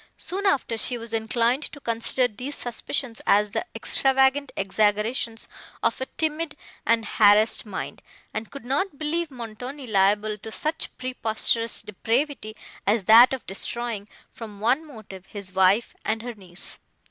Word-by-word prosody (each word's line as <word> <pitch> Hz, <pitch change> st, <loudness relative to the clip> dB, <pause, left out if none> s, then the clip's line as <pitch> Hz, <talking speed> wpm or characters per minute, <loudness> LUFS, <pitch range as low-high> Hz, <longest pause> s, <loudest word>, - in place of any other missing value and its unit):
Soon 395 Hz, +3 st, -2 dB
after, 260 Hz, -10 st, +1 dB
she 245 Hz, +2 st, -1 dB
was 230 Hz, -1 st, -8 dB
inclined 230 Hz, +4 st, +1 dB
to 290 Hz, -, -6 dB
consider 235 Hz, +1 st, 0 dB
these 250 Hz, +6 st, -6 dB
suspicions 240 Hz, 0 st, -2 dB
as 205 Hz, 0 st, +4 dB
the 365 Hz, -, -2 dB
extravagant 270 Hz, +1 st, +2 dB
exaggerations 215 Hz, +4 st, 0 dB, 0.4 s
of -, -, +1 dB
a 260 Hz, -, -2 dB
timid 315 Hz, -1 st, -2 dB, 0.3 s
and 230 Hz, -1 st, +3 dB
harassed 215 Hz, +1 st, +4 dB
mind, 195 Hz, -, -5 dB, 0.3 s
and 215 Hz, +1 st, -4 dB
could 280 Hz, -4 st, -10 dB
not 285 Hz, +5 st, -1 dB
believe 320 Hz, +2 st, -1 dB
Montoni 250 Hz, +2 st, -7 dB
liable 210 Hz, 0 st, +2 dB
to 220 Hz, -, -8 dB
such 310 Hz, +7 st, -2 dB
preposterous 230 Hz, -2 st, +1 dB
depravity 225 Hz, +2 st, -2 dB, 0.3 s
as 210 Hz, 0 st, +3 dB
that 230 Hz, +6 st, +8 dB
of 265 Hz, -2 st, -4 dB
destroying, 220 Hz, +1 st, -3 dB, 0.2 s
from 215 Hz, -3 st, -9 dB
one 255 Hz, +9 st, +2 dB
motive, 195 Hz, -8 st, -11 dB
his 200 Hz, -3 st, -7 dB
wife 190 Hz, +4 st, +3 dB
and 220 Hz, +1 st, -1 dB
her 245 Hz, 0 st, -5 dB
niece. 185 Hz, -4 st, -12 dB
230 Hz, 145 wpm, -25 LUFS, 210-265 Hz, 0.4 s, that